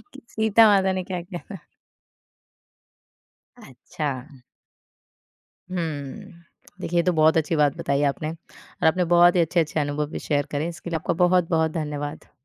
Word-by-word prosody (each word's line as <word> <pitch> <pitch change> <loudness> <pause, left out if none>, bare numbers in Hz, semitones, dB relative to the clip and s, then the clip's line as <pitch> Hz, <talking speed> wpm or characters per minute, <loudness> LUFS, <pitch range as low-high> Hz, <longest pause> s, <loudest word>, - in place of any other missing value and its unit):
कि 275 - -12
सीता 220 0 +4
माता 190 -1 +2
ने 185 0 -2
क्या 180 -2 -4
किया 175 -1 -8 0.2
था? - - -16 2.0
अच्छा। 135 0 -7 1.3
हुँ। 170 +2 -5 0.5
देखिए, 175 +1 -1
ये - - +4
तो 180 - +2
बहुत 160 0 +4
अच्छी 160 0 +1
बात 145 -2 +2
बताई 140 +1 -1
आपने 155 +2 -5
और 165 0 -7
आपने 180 +3 +3
बहुत 175 +1 +5
ही 175 - +4
अच्छे-अच्छे 160 -1 +1
अनुभव 145 +1 -1
भी - - -5
शेयर 145 -1 -1
करे। 150 +3 -2
इसके 170 0 -8
लिए 165 - -1
आपका 155 - -2
बहुत-बहुत 165 -3 +2
धन्यवाद। 150 -2 -5
160 Hz, 150 wpm, -24 LUFS, 150-180 Hz, 2.0 s, बहुत